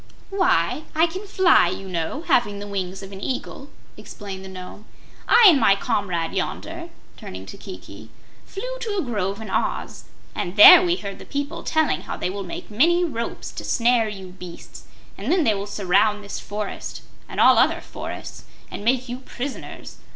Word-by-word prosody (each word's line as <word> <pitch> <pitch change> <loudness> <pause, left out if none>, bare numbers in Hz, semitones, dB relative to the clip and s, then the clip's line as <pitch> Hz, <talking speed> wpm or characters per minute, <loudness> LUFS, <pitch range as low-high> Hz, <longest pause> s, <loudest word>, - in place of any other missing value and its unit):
"Why, 365 -5 +1
I 320 +2 +5
can 375 +5 -6
fly, 375 - +5
you 195 +2 -6
know, 180 - -3
having 210 -10 +2
the 205 - -6
wings 195 -1 -4
of 195 - -9
an 195 0 -9
Eagle," 270 +3 -5 0.3
explained 195 -2 -9
the 190 - -9
Nome. 185 +3 -10 0.4
"I 475 - +7
and 305 -6 +5
my 195 - +5
comrade 195 -7 -2
yonder," - - -4 0.3
turning 95 +1 -9
to 95 - -10
Kiki, 100 +4 -11 0.3
"flew - - -6
to 440 -4 -3
a 375 - 0
grove 205 -5 -2
in 220 -3 -7
Oz, - - -2 0.3
and 175 - -4
there 275 +11 +11
we 350 -1 +1
heard 200 - -7
the - - -9
people 285 0 -4
telling 315 -1 +1
how - - -6
they 180 - -2
will 200 +1 -5
make 180 +3 -8
many 345 +11 +3
ropes 235 -8 -5
to - - -7
snare 235 -2 +2
you 190 -3 -8
beasts, 180 -2 -11 0.3
and - - -2
then 355 -2 +3
they 225 -6 +3
will 200 0 -4
surround 205 +1 +1
this 200 - -6
forest, 205 0 -6 0.3
and - - -6
all - - +7
other - - +3
forests, - - -8 0.3
and - - -6
make 255 +3 +1
you 245 +1 -5
prisoners. 265 +1 -7
210 Hz, 180 wpm, -23 LUFS, 190-290 Hz, 0.4 s, there